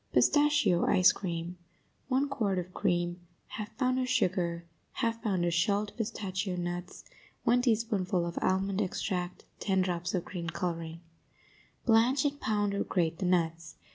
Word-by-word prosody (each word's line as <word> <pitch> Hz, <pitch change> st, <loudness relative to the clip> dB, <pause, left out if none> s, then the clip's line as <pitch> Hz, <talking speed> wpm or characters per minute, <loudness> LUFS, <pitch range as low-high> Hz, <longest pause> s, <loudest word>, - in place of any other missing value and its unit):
PISTACHIO 290 Hz, -, +4 dB
ICE 185 Hz, 0 st, +6 dB
CREAM 175 Hz, -1 st, -4 dB, 0.5 s
1 270 Hz, +2 st, +2 dB
quart 220 Hz, -9 st, -1 dB
of 180 Hz, 0 st, -4 dB
cream 175 Hz, 0 st, 0 dB, 0.4 s
1/2 210 Hz, -, -3 dB
pound 255 Hz, 0 st, +1 dB
of 255 Hz, -1 st, -1 dB
sugar 175 Hz, -8 st, 0 dB, 0.3 s
1/2 230 Hz, 0 st, 0 dB
pound 190 Hz, -5 st, 0 dB
of 170 Hz, -, +1 dB
shelled 200 Hz, +4 st, +1 dB
pistachio 190 Hz, -4 st, -3 dB
nuts 175 Hz, 0 st, -5 dB, 0.4 s
1 245 Hz, +1 st, +4 dB
teaspoonful 215 Hz, -6 st, +1 dB
of 170 Hz, -, -3 dB
almond 195 Hz, +1 st, +1 dB
extract 180 Hz, -2 st, -3 dB
10 190 Hz, -2 st, +1 dB
drops 175 Hz, 0 st, -2 dB
of 180 Hz, -, -2 dB
green 170 Hz, -2 st, -5 dB
coloring 165 Hz, -1 st, -4 dB, 0.8 s
Blanch 245 Hz, +4 st, +4 dB
and 285 Hz, 0 st, -1 dB
pound 205 Hz, -2 st, 0 dB
or 200 Hz, -, 0 dB
grate 165 Hz, -3 st, 0 dB
the 190 Hz, -, -1 dB
nuts. 165 Hz, -2 st, 0 dB
185 Hz, 145 wpm, -30 LUFS, 175-225 Hz, 0.8 s, ICE